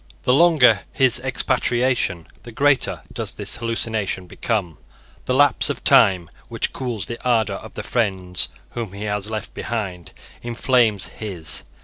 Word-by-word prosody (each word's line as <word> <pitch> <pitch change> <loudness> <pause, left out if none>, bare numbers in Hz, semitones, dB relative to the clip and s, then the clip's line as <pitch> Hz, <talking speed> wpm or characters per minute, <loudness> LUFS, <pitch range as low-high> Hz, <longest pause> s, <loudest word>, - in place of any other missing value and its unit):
The 125 - +3
longer 135 -9 +5
his 130 -3 +3
expatriation, 125 -7 0 0.2
the 120 - -11
greater 140 +3 +1
does - - -3
this - - 0
hallucination 110 -5 -2
become. 90 -3 -3 0.5
The 125 - 0
lapse 145 -2 +4
of - - -4
time, 90 -4 +4 0.2
which - - -2
cools 120 -6 -3
the 115 - -7
ardour 110 -5 +1
of - - -12
the - - -5
friends 95 -6 -1 0.2
whom 115 -5 -5
he 100 +1 -7
has 105 0 -2
left 110 -2 -5
behind, 95 -7 -5 0.3
inflames 120 -4 +1
his. 95 -7 0
110 Hz, 140 wpm, -21 LUFS, 100-125 Hz, 0.5 s, longer